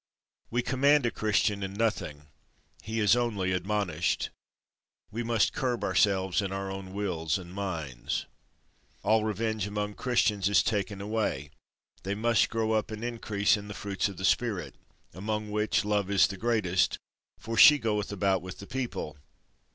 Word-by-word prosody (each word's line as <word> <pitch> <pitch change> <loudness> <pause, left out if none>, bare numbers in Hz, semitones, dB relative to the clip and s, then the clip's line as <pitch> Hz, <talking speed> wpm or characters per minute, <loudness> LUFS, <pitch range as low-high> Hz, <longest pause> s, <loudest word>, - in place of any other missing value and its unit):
We 120 +1 0
command 140 +2 +3
a 120 - +1
Christian 105 -1 +1
in 95 0 -4
nothing, 100 -9 -2 0.6
he 110 +1 -3
is 105 +1 +5
only 105 -6 0
admonished. 90 -3 -1 0.8
We 115 +3 -3
must 115 -2 +1
curb 125 -3 -1
ourselves 95 -1 +2
in 100 -1 -3
our 95 0 -3
own 95 -1 -7
wills 90 -5 -1
and 90 -1 -10
minds. 80 -11 -3 0.8
All 110 +2 +3
revenge 110 -1 -1
among 105 0 -3
Christians 105 -5 +1
is 100 - +4
taken 100 -2 -1
away; 100 -10 -2 0.5
they 100 +1 -3
must 115 +1 +2
grow 110 -1 0
up 110 0 +1
and 110 +1 -6
increase 115 -3 +1
in 105 -1 -7
the 105 - -7
fruits 100 0 -2
of 95 - -9
the 95 - -2
spirit, 110 -3 0 0.4
among 105 +2 -3
which 105 0 +1
love 105 -2 0
is 100 -2 +5
the 100 - -4
greatest, 100 -4 +1 0.4
for 115 - -5
she 150 +6 +9
goeth 105 -5 -1
about 95 -2 +1
with 95 +1 -8
the 100 - -9
people. 120 - -4
105 Hz, 160 wpm, -29 LUFS, 95-110 Hz, 0.8 s, she